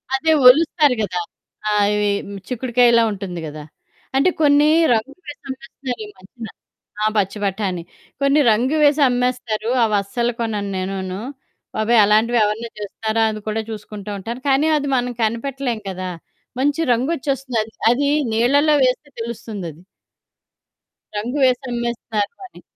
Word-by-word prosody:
అదే 320 +4 +1 0.2
ఒలుస్తారు 300 0 +5
కదా! 180 -3 -2 0.5
ఆ! - - +1 0.2
ఇవి 210 0 +1 0.4
చిక్కుడుకాయలా 240 -1 +3
ఉంటుంది 185 -3 -5
కదా! 150 0 -8 0.5
అంటే 275 +7 +4
కొన్ని 290 0 +5 0.3
రంగులేసి 280 +7 -5
అమ్మేస్తున్నారిమద్యన 235 -5 -8 0.6
ఆ! - - +2
పచ్చి 200 +1 0
బటాణి 190 -3 -2 0.4
కొన్ని 275 +2 +4
రంగు 250 +8 +2
వేసి 290 +1 +4
అమ్మేస్తారు. 245 -3 -1 0.2
అవస్సలు 215 +4 0
కొనను 210 -3 -2
నేనును. 190 0 -4 0.6
బాబోయ్! 220 +1 +4
అలాంటివెవరన్నా 220 +1 +2
చేస్తారా? 220 +2 -2
అని 215 0 -6
కూడా 220 +1 -1
చూసుకుంటూ 210 -1 -7
ఉంటాను. 235 +6 -6
కానీ 275 +4 +3
అది 285 -1 -2
మనం 245 0 -1
కనిపెట్టలేం 240 +1 -2
కదా! 185 0 -5 0.5
మంచి 290 +4 +1
రంగొచ్చేస్తుంది 270 -2 -1
అది. 220 0 -11 0.2
అది 280 +3 +2 0.2
నీళ్ళలో 285 +7 +3
వేస్తే 255 +4 0
తెలుస్తుందది. 210 -8 -6 1.4
రంగు 245 +7 -3
వేసమ్మేస్తన్నారు 240 -1 -2
అని. - - -17
235 Hz, 115 wpm, -20 LUFS, 210-270 Hz, 1.4 s, ఒలుస్తారు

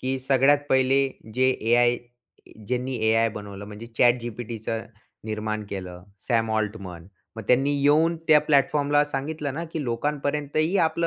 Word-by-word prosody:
की 130 +1 -2
सगळ्यात 135 +2 +4
पहिले 130 +1 +3 0.3
जे 130 +1 +3
ए-आय, 120 0 +2 0.7
ज्यांनी 125 +1 -2
ए-आय 115 +1 +3
बनवलं, 100 -1 -8
म्हणजे 105 +2 -9
ChatGPTच 120 -2 0 0.6
निर्माण 110 0 -3
केलं, 90 -2 -6 0.3
Sam 115 -1 +2
Altman. 100 -5 -5 0.3
मग 110 - -5
त्यांनी 135 +3 +3
येऊन 160 +4 +4
त्या 150 -1 +7
प्लॅटफॉर्मला 145 +1 +3
सांगितलं 145 0 -4
ना 165 +2 -4
की 160 - -2
"लोकांपर्यंतही 145 +6 -1
आपली 165 +1 -1
130 Hz, 130 wpm, -25 LUFS, 110-145 Hz, 0.7 s, त्या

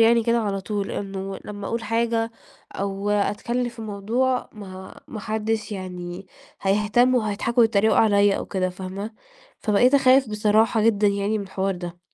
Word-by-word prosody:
يعني 230 +1 +5
كده 235 +1 +2
على 200 -3 -1
طول 200 +1 -3
إنه 195 -1 -5
لمّا 205 -1 -6
أقول 230 0 -2
حاجة 230 +1 0 0.4
أو 200 +1 -3
أتكلّم 235 +4 0
في 235 -1 -9
موضوع 225 +5 -1
ما 190 -3 -10
ما 215 - -6
حدّش 220 0 -2
يعني 180 -1 -6 0.4
هيهتم 210 +6 +3
وهيضحكوا 230 +1 0
ويتّريقوا 220 -2 +4
عليّا 205 -2 +4
أو - - -5
كده 185 -1 -1
فاهمة، 190 +3 -6 0.5
فبقيت 235 +5 +3
أخاف 265 -2 +5
بصراحة 215 +1 +2
جدًا 210 -2 +3
يعني 200 +2 +1
من 200 - -4
الحوار 190 0 -2
ده. 175 0 -7
210 Hz, 155 wpm, -23 LUFS, 195-230 Hz, 0.5 s, يعني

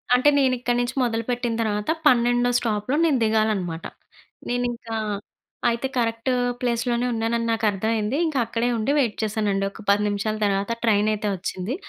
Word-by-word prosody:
అంటే 255 +4 +5
నేను 260 -2 +3
ఇక్కడి 245 0 0
నుంచి 245 +2 -2
మొదలుపెట్టిన 240 0 -1
తర్వాత, 210 +1 -1 0.2
12 245 -1 +3
స్టాపులో 220 +4 -1
నేను 290 -5 +3
దిగాలనమాట. 215 -6 0 0.6
నేను 245 0 0
ఇంకా, 230 -1 -7 0.7
అయితే 235 +3 -1
కరెక్ట్ 230 +1 0 0.3
ప్లేస్‌లోనే 240 0 0
ఉన్నానని 230 +1 -1
నాకు 225 -1 0
అర్థం 205 +2 -2
అయింది. 215 +6 -1
ఇంకా 295 -5 0
అక్కడే 230 +1 -1
ఉండి 220 +6 0
వెయిట్ 240 -7 +1
చేశానండి. 205 -2 0
ఒక 220 - -12
10 205 +1 +4
నిమిషాల 205 +1 -1
తర్వాత, 200 +2 0
ట్రైన్ 210 -2 +3
అయితే 210 0 -3
వచ్చింది. 185 +4 -4
230 Hz, 155 wpm, -23 LUFS, 210-245 Hz, 0.7 s, అంటే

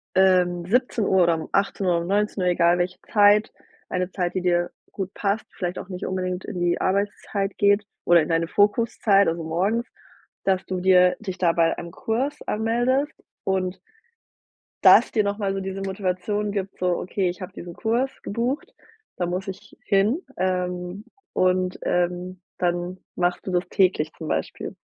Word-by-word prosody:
ähm, 180 -2 +4
17 215 -4 +2
oder 170 -1 +3
um 160 - -6
18 195 -2 +1
oder 170 - +1
um - - -6
19, 200 -2 +1
egal 170 0 +3
welche 180 +1 -2
Zeit, 210 0 +5 0.4
eine 180 0 -2
Zeit, 180 -1 -2
die 185 - 0
dir 175 -1 +1 0.2
gut 190 -2 -4
passt, 205 +1 -1
vielleicht 180 0 -3
auch - - -9
nicht 180 -1 -5
unbedingt 185 -1 -3
in 190 -4 -5
die 175 0 +1
Arbeitszeit 200 0 -1
geht 200 0 +4 0.2
oder 175 -1 +6
in 155 - -3
deine 165 0 +1
Fokuszeit, 205 0 +3
also 165 0 -1
morgens, 195 +9 0 0.6
dass 190 -1 +1
du 185 -1 -3
dir 180 -1 +5
dich 190 -4 -5
da 175 -2 +3
bei 165 -1 +2
einem 170 - -7
Kurs 245 - -2
anmeldest 240 +7 +1 0.3
und 190 -1 -1 1.0
das - - +7
dir 215 - +3
nochmal 200 -1 -1
so 195 - -2
diese 190 0 -5
Motivation 195 +2 -2
gibt, 195 -1 -4
so: 180 -1 +1
„Okay, 185 0 -1
ich 180 - -9
habe 185 - -7
diesen 175 0 -8
Kurs 235 +7 0
gebucht, 240 +7 -3 0.4
da 175 - -1
muss 180 +2 -3
ich 195 +2 -9
hin." 205 - +2 0.2
Ähm, 180 +1 -2 0.3
und, 185 0 +1
ähm, 180 +1 -1 0.2
dann 175 +1 -1 0.2
machst 175 0 0
du 190 - -3
das 180 0 +1
täglich, 180 -5 +2
zum 160 - -7
Beispiel. 80 - -3
185 Hz, 165 wpm, -24 LUFS, 180-205 Hz, 1.0 s, das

